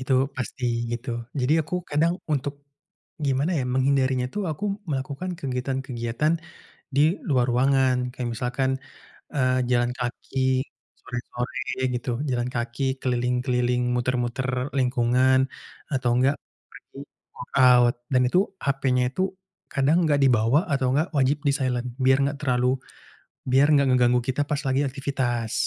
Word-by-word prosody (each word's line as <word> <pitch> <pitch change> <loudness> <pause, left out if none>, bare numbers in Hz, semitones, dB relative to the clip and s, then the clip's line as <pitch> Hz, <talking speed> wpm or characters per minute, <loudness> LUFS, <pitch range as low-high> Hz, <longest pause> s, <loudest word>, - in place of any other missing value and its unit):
Itu 130 +1 -2 0.2
pasti, 130 0 -4 0.3
gitu. 120 +2 -5 0.3
Jadi 125 +4 +2
aku 170 - -6 0.2
kadang 165 +4 +2 0.2
untuk 140 0 -1 0.7
gimana 135 +5 +1
ya, 130 - -1
menghindarinya 130 -1 +2
itu, 210 - -3
aku 155 +7 -5 0.3
melakukan 140 +6 -3
kegiatan-kegiatan, 130 +1 -2 0.6
di 140 - +3 0.3
luar 130 -4 +3
ruangan. 130 +1 +3 0.2
Kayak 125 -1 -4
misalkan, 125 +3 -1 0.6
eee, 130 -2 +2
jalan 120 0 +2
kaki 125 +2 -4 0.6
sore-sore, 125 +2 -4
gitu. 120 - -4 0.2
Jalan 125 0 -1
kaki 120 +3 -3 0.2
keliling-keliling, 125 0 0
muter-muter 125 +1 -1 0.3
lingkungan, 130 0 +3 0.5
atau 130 -2 +1
enggak, 135 +3 +3 0.3
pergi - - -16 0.4
workout. 125 -3 +4 0.2
Dan 125 -1 +4
itu, 180 +9 +3 0.3
hapenya 135 -2 +1
itu, 185 - -2 0.5
kadang 140 +4 +2
enggak 145 -3 +2
dibawa 120 +1 +4
atau 135 -2 +1
enggak, 150 +6 +1
wajib 135 +1 +3
di-silent, 130 -3 0 0.2
biar 130 0 +5
enggak 140 +1 0
terlalu, 125 -2 +2 0.8
biar 135 +2 +5
enggak 140 -1 +4
ngeganggu 125 -1 +4
kita 130 +3 +1
pas 145 -1 -1
lagi 135 +1 +2
aktivitas. 130 -4 -2
130 Hz, 125 wpm, -25 LUFS, 125-140 Hz, 0.8 s, biar